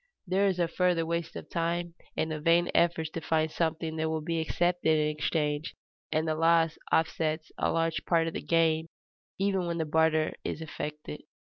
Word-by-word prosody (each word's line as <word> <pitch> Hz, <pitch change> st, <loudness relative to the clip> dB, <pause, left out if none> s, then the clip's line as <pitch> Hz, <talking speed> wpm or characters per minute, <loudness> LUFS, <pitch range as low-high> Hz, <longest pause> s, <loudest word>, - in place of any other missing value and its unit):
There 195 Hz, +2 st, +2 dB
is 190 Hz, -2 st, 0 dB
a 175 Hz, -1 st, +2 dB
further 175 Hz, -1 st, +1 dB
waste 170 Hz, 0 st, -3 dB
of -, -, -7 dB
time 170 Hz, 0 st, -1 dB, 0.2 s
and 160 Hz, 0 st, 0 dB
of 155 Hz, -1 st, -5 dB
vain 170 Hz, +1 st, +4 dB
efforts 165 Hz, -2 st, +2 dB
to 165 Hz, -, -5 dB
find 160 Hz, 0 st, +1 dB
something 160 Hz, -1 st, -1 dB
that 160 Hz, 0 st, 0 dB
will 160 Hz, -1 st, -2 dB
be 165 Hz, +1 st, -1 dB
accepted 170 Hz, 0 st, +1 dB
in 150 Hz, 0 st, +2 dB
exchange, 150 Hz, 0 st, -1 dB, 0.4 s
and 160 Hz, +1 st, +1 dB
the 155 Hz, -, +1 dB
loss 165 Hz, 0 st, +3 dB, 0.2 s
offsets 160 Hz, 0 st, 0 dB
a -, -, +1 dB
large 165 Hz, -1 st, 0 dB
part 165 Hz, -2 st, +2 dB
of 165 Hz, -, -3 dB
the -, -, -4 dB
gain 165 Hz, -1 st, +2 dB, 0.5 s
even 195 Hz, -2 st, 0 dB
when 170 Hz, 0 st, -2 dB
the 160 Hz, -, 0 dB
barter 155 Hz, 0 st, +2 dB
is -, -, -3 dB
effected. 150 Hz, -, -6 dB
160 Hz, 185 wpm, -29 LUFS, 155-170 Hz, 0.5 s, vain